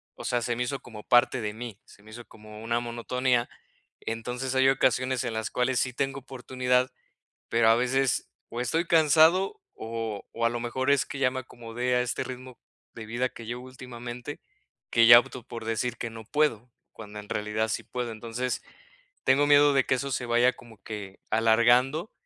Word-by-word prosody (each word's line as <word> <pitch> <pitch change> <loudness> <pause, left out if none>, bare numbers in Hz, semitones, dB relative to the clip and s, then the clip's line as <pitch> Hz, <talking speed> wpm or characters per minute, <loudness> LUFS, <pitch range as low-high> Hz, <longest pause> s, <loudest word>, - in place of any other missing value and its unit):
o - - -10
sea, 120 -1 0
se 120 +1 -1
me 125 - -1
hizo 135 +3 -3
como 110 -3 -11
parte 120 +1 +3
de 105 -1 -3
mí, 115 -2 -8
se 100 - -18
me 110 - -16
hizo 120 +2 -10
como 105 0 -13
una 115 +1 0
monotonía. 120 +1 -1 0.5
Entonces 125 +3 -4
hay 130 0 +5
ocasiones 130 -1 +1
en 120 - -3
las 110 0 -3
cuales 125 0 +1
sí 130 -2 -1
tengo 135 +1 -2
oportunidad, 125 -1 -1 0.6
pero 115 -1 +4
a 115 - +6
veces, 125 +1 +1 0.2
o 120 - -4
estoy 160 +8 0
cansado, 165 - +4
o 110 -2 -5
o 115 0 -2
a - - +4
lo 120 0 -3
mejor 130 +3 -2
es 140 -1 +3
que 140 - -7
ya 125 -2 +3
me 130 - -4
acomodé 120 0 -3
a 125 - +3
este 125 - -2
ritmo 130 -1 -9 0.4
de 110 - -8
vida 120 +3 -1
que 115 - -11
llevo 120 +2 -5
últimamente, 125 +1 -8 0.5
que 115 0 +5
ya 120 0 +11
opto 125 0 -7
por 115 -1 -8
decir 115 +1 -2
que 115 - -4
no 115 0 -10
puedo, 125 -4 0 0.2
cuando 105 -1 -9
en 105 - -12
realidad 105 +1 -1
sí 110 - -2
puedo, 125 -2 -4
entonces, 115 +3 -4 0.6
tengo 145 +2 +4
miedo 145 0 +6
de 135 -1 +3
que 130 - +2
eso 140 +2 -3
se 125 - -2
vaya 120 +2 +3
como 115 -2 -16
que 100 -3 -8
alargando, 120 - +3
120 Hz, 195 wpm, -27 LUFS, 115-130 Hz, 0.6 s, ya